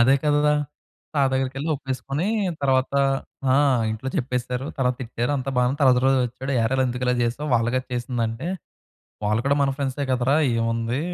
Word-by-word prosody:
అదే 130 Hz, +3 st, +6 dB
కదా! 150 Hz, 0 st, +3 dB, 0.6 s
సార్ 140 Hz, -2 st, +3 dB
దగ్గరికెళ్ళి 135 Hz, +3 st, -1 dB
ఒప్పేసుకొని, 135 Hz, +4 st, -3 dB, 0.4 s
తర్వాత 130 Hz, -1 st, +2 dB, 0.6 s
ఆ! -, -, +4 dB, 0.4 s
ఇంట్లో 110 Hz, +5 st, -4 dB
చెప్పేసారు. 125 Hz, +1 st, -2 dB
తర్వాత 125 Hz, -1 st, +2 dB
తిట్టారు. 120 Hz, +3 st, -2 dB
అంతా 135 Hz, 0 st, -3 dB
బానే 125 Hz, 0 st, +3 dB
ఉంది. 145 Hz, -, -4 dB
తర్వాత 125 Hz, -2 st, +6 dB
రోజు 135 Hz, 0 st, +4 dB
వచ్చాడు. 130 Hz, +3 st, -5 dB
"ఏరా 115 Hz, +4 st, +1 dB
ఎందుకు 125 Hz, +1 st, -3 dB
ఇలా 125 Hz, -, +3 dB
చేసావు? 130 Hz, +6 st, -2 dB
వాళ్లు 115 Hz, 0 st, +2 dB
కదా 130 Hz, 0 st, 0 dB
చేసింది" 120 Hz, -1 st, -2 dB
అంటే, 115 Hz, +8 st, -5 dB, 0.8 s
"వాళ్ళు 105 Hz, +2 st, +1 dB
కూడా 140 Hz, +1 st, +3 dB
మన 135 Hz, -, +2 dB
ఫ్రెండ్సే 140 Hz, 0 st, -2 dB
కదరా, 130 Hz, +3 st, +2 dB, 0.2 s
ఏముంది? 115 Hz, +2 st, -1 dB
130 Hz, 165 wpm, -23 LUFS, 120-135 Hz, 0.8 s, అదే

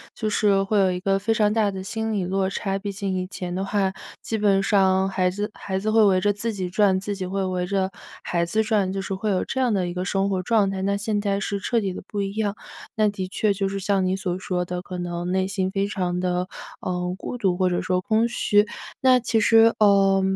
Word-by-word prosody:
就 215 Hz, -2 st, -2 dB
是 200 Hz, -2 st, +2 dB
会 205 Hz, +1 st, +1 dB
有 190 Hz, -1 st, +4 dB
一 180 Hz, -, -3 dB
个 195 Hz, -1 st, +1 dB
非 225 Hz, +3 st, +1 dB
常 210 Hz, -1 st, +2 dB
大 215 Hz, -2 st, +2 dB
的 190 Hz, -1 st, -5 dB
心 220 Hz, +2 st, -3 dB
理 195 Hz, -3 st, 0 dB
落 190 Hz, +1 st, 0 dB
差， 195 Hz, 0 st, -2 dB
毕 205 Hz, 0 st, -5 dB
竟 195 Hz, -1 st, -3 dB
以 185 Hz, 0 st, -3 dB
前 180 Hz, -2 st, -6 dB
的 190 Hz, +2 st, -2 dB
话， 195 Hz, -1 st, 0 dB, 0.3 s
基 220 Hz, -, -3 dB
本 200 Hz, -2 st, +3 dB
上 190 Hz, -1 st, +3 dB
孩 185 Hz, -1 st, +1 dB
子 205 Hz, +3 st, -4 dB
孩 190 Hz, -1 st, -4 dB
子 215 Hz, +3 st, -1 dB
会 225 Hz, 0 st, +5 dB
围 185 Hz, -2 st, +3 dB
着 205 Hz, -, +3 dB
自 220 Hz, +3 st, -2 dB
己 185 Hz, -3 st, -3 dB
转， 190 Hz, 0 st, +3 dB
自 205 Hz, +1 st, -3 dB
己 185 Hz, -, -3 dB
会 195 Hz, +1 st, -2 dB
围 180 Hz, -1 st, -2 dB
着 190 Hz, -1 st, 0 dB, 0.3 s
孩 170 Hz, -1 st, 0 dB
子 220 Hz, +6 st, +1 dB
转， 200 Hz, -3 st, +1 dB
就 195 Hz, -, -2 dB
是 195 Hz, -, -4 dB
会 210 Hz, +3 st, -2 dB
有 190 Hz, -, +1 dB
这 265 Hz, -, -4 dB
样 245 Hz, -4 st, +2 dB
的 180 Hz, -3 st, 0 dB
一 -, -, -5 dB
个 180 Hz, +1 st, -3 dB
生 195 Hz, 0 st, 0 dB
活 185 Hz, -2 st, 0 dB
状 205 Hz, 0 st, +2 dB
态。 190 Hz, -1 st, -3 dB
那 200 Hz, +1 st, +1 dB
现 205 Hz, +1 st, -1 dB
在 200 Hz, -1 st, 0 dB
是 200 Hz, 0 st, -2 dB
彻 230 Hz, +3 st, 0 dB
底 195 Hz, -2 st, -2 dB
地 -, -, -7 dB
不 205 Hz, -1 st, -3 dB
一 195 Hz, 0 st, -2 dB
样， 210 Hz, -2 st, -1 dB, 0.4 s
那 215 Hz, -1 st, +3 dB
的 190 Hz, -2 st, -4 dB
确 205 Hz, +2 st, 0 dB
就 195 Hz, 0 st, -1 dB
是 195 Hz, 0 st, -3 dB
像 195 Hz, -1 st, +1 dB
你 185 Hz, +1 st, +1 dB
所 185 Hz, -1 st, -3 dB
说 180 Hz, -2 st, -2 dB
的 180 Hz, 0 st, -4 dB
可 180 Hz, 0 st, -7 dB
能 175 Hz, 0 st, -4 dB
内 190 Hz, 0 st, +1 dB
心 190 Hz, -1 st, -1 dB
非 195 Hz, 0 st, -1 dB
常 180 Hz, -3 st, -2 dB
地， 180 Hz, 0 st, -1 dB, 0.3 s
呃， 180 Hz, -, -3 dB, 0.2 s
孤 245 Hz, -, -6 dB
独 185 Hz, -4 st, +1 dB
或 185 Hz, -1 st, +2 dB
者 175 Hz, -, 0 dB
说 180 Hz, 0 st, 0 dB
空 220 Hz, +3 st, +2 dB
虚， 210 Hz, -3 st, +2 dB, 0.3 s
那 255 Hz, -1 st, +5 dB
其 225 Hz, -1 st, 0 dB
实， 225 Hz, +1 st, +5 dB
呃， 195 Hz, -2 st, +5 dB
195 Hz, 275 characters per minute, -24 LUFS, 185-210 Hz, 0.4 s, 会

